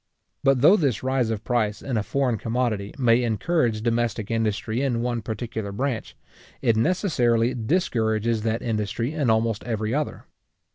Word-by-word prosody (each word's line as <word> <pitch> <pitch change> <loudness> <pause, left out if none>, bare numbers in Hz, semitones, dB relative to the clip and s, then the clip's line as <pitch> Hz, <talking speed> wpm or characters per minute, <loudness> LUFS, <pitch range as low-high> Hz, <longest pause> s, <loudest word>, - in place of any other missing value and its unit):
But 135 -2 +3
though 180 +9 +7
this 130 - 0
rise 130 -3 +1
of 110 -2 -3
price 110 -4 0
in 130 - -3
a 110 - +2
foreign 125 0 0
commodity, 115 -4 -1
may 120 -2 +4
encourage 115 - 0
domestic 115 -2 -1
industry 110 +1 -1
in 120 -4 0
one 120 -1 -1
particular 110 -1 -4
branch, 125 +2 -3 0.4
it 115 - +2
necessarily 120 - +2
discourages 115 - 0
that 110 +1 -1
industry 115 +3 -2
in 145 -6 0
almost 110 -1 +1
every 110 -1 -2
other. 150 +1 -2
115 Hz, 150 wpm, -24 LUFS, 110-130 Hz, 0.4 s, though